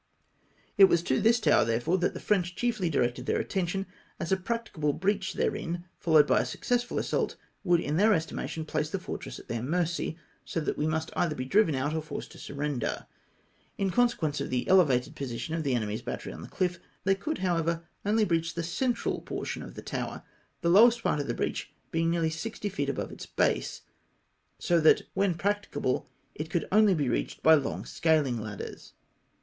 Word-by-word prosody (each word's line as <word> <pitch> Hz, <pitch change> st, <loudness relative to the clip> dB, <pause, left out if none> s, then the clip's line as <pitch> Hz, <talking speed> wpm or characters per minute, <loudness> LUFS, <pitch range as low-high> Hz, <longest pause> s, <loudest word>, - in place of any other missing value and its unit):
It 195 Hz, -, +11 dB
was 170 Hz, -3 st, +2 dB
to 130 Hz, -5 st, +1 dB
this 235 Hz, +2 st, +4 dB
tower 215 Hz, -, +4 dB
therefore 120 Hz, +9 st, +1 dB
that 175 Hz, -, 0 dB
the -, -, -4 dB
French 180 Hz, -4 st, 0 dB
chiefly 215 Hz, -8 st, 0 dB
directed 125 Hz, -5 st, 0 dB
their -, -, +1 dB
attention, 190 Hz, +1 st, -1 dB, 0.3 s
as 170 Hz, -, -3 dB
a -, -, +6 dB
practicable 185 Hz, -7 st, -2 dB
breach 195 Hz, +3 st, 0 dB
therein, 175 Hz, +1 st, -2 dB
followed 155 Hz, -3 st, +5 dB
by -, -, +3 dB
a -, -, -2 dB
successful 245 Hz, 0 st, -1 dB
assault, -, -, 0 dB, 0.3 s
would 175 Hz, -1 st, +4 dB
in 150 Hz, -1 st, -1 dB
theu' 210 Hz, +2 st, +5 dB
estima 165 Hz, -7 st, 0 dB
tion 160 Hz, -1 st, -4 dB
place 155 Hz, 0 st, -1 dB
the 195 Hz, -, -2 dB
fortress 185 Hz, -, -6 dB
at -, -, -13 dB
their 115 Hz, -1 st, -3 dB
mercy, 165 Hz, +3 st, -1 dB, 0.3 s
so -, -, -3 dB
that 155 Hz, -, -1 dB
we 150 Hz, -, +1 dB
must 160 Hz, 0 st, -1 dB
either 160 Hz, -3 st, +1 dB
be 130 Hz, -, -4 dB
driven 180 Hz, +1 st, +3 dB
out 140 Hz, +3 st, -1 dB
or 160 Hz, -, -1 dB
forced 155 Hz, -1 st, -7 dB
to -, -, -13 dB
siu 140 Hz, -, -8 dB
render. 140 Hz, -4 st, -2 dB, 0.7 s
In 195 Hz, -1 st, 0 dB
con 245 Hz, +4 st, +4 dB
sequence 150 Hz, -10 st, -2 dB
of -, -, -3 dB
the 125 Hz, -1 st, -1 dB
elevated 145 Hz, -10 st, +4 dB
position 135 Hz, +3 st, -4 dB
of 165 Hz, -, -1 dB
the 140 Hz, -4 st, 0 dB
enemy's 110 Hz, -2 st, -2 dB
bat -, -, -4 dB
tery -, -, -7 dB
on -, -, -9 dB
the -, -, -8 dB
chff, 180 Hz, -1 st, -1 dB, 0.2 s
they 195 Hz, -, +4 dB
could 300 Hz, +11 st, -3 dB
however 170 Hz, -2 st, 0 dB, 0.2 s
only 215 Hz, +1 st, +3 dB
breach 165 Hz, -2 st, 0 dB
the 170 Hz, -, -2 dB
central 235 Hz, +8 st, -1 dB
portion -, -, -4 dB
of -, -, -9 dB
the -, -, -8 dB
tower, -, -, -4 dB, 0.4 s
the 170 Hz, -, +1 dB
lowest 230 Hz, +5 st, +6 dB
part 150 Hz, -, +1 dB
of 145 Hz, -, -2 dB
the 120 Hz, -, -1 dB
breach -, -, -3 dB, 0.2 s
being 165 Hz, 0 st, +1 dB
nearly 165 Hz, -1 st, +1 dB
sixty 205 Hz, +5 st, -4 dB
feet 145 Hz, -8 st, -2 dB
above -, -, -3 dB
its -, -, -9 dB
base, -, -, 0 dB, 0.8 s
so 170 Hz, -1 st, +2 dB
that 155 Hz, -, +5 dB
when 190 Hz, -2 st, +1 dB
practicable, 200 Hz, -8 st, -1 dB, 0.2 s
it 155 Hz, +1 st, -5 dB
could 170 Hz, +1 st, -1 dB
only 210 Hz, -1 st, +5 dB
be 145 Hz, -4 st, 0 dB
reached 120 Hz, -, -2 dB
by 160 Hz, -, +8 dB
long 145 Hz, -3 st, +1 dB
scaling 150 Hz, -8 st, +1 dB
ladders. 105 Hz, -2 st, -8 dB
165 Hz, 200 wpm, -29 LUFS, 150-195 Hz, 0.8 s, It